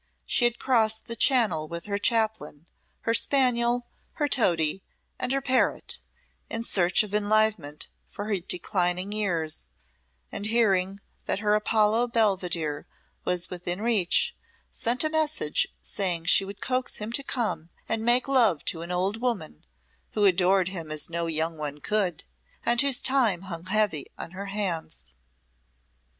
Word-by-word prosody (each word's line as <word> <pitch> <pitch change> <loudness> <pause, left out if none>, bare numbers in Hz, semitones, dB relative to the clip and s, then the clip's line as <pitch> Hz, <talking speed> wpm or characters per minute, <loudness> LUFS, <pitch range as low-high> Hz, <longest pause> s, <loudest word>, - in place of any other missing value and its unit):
She 240 - +3
had 240 -1 +2
crossed 220 -4 +2
the 230 - -4
Channel 215 - +3
with 170 +1 -6
her 200 -1 -2
Chaplain, 215 - -1 0.4
her 230 - 0
spaniel, 245 -2 +3 0.3
her 295 - -1
toady, 175 - +2 0.4
and 250 - -2
her 275 0 +1
parrot, 260 -1 +1 0.5
in 230 0 -3
search 185 -3 +3
of 210 -1 -9
enlivenment 210 -7 +1 0.2
for 205 - -6
her 205 -3 -1
declining 180 +1 -1
years, 170 - -1 0.6
and 205 - -2
hearing 200 -4 +1 0.2
that - - -1
her 210 0 +1
Apollo 215 +2 +2
Belvidere 180 -9 0 0.4
was 180 -1 0
within 180 0 -3
reach, 215 -6 +2 0.4
sent 240 +5 0
a 310 - +1
message 310 - +1
saying 175 -4 0
she 195 +4 +5
would 200 +1 -10
coax 255 0 0
him 210 +1 -5
to 260 - 0
come 225 -11 -2 0.2
and 225 0 -1
make 240 +2 +3
love 235 - +3
to 165 - -1
an 170 +1 -6
old 190 +5 -1
woman, 230 - -3 0.5
who 210 -1 +2
adored 185 0 +3
him 170 -5 -7
as 155 +2 0
no 170 0 -2
young 160 0 -1
one 150 -1 -5
could, 185 -1 -1 0.4
and 240 +1 +4
whose 275 -3 +2
time 240 -10 +2
hung 175 -3 -7
heavy 205 -6 0
on - - -7
her 195 +2 -7
hands. 180 - -3
200 Hz, 150 wpm, -26 LUFS, 175-230 Hz, 0.6 s, she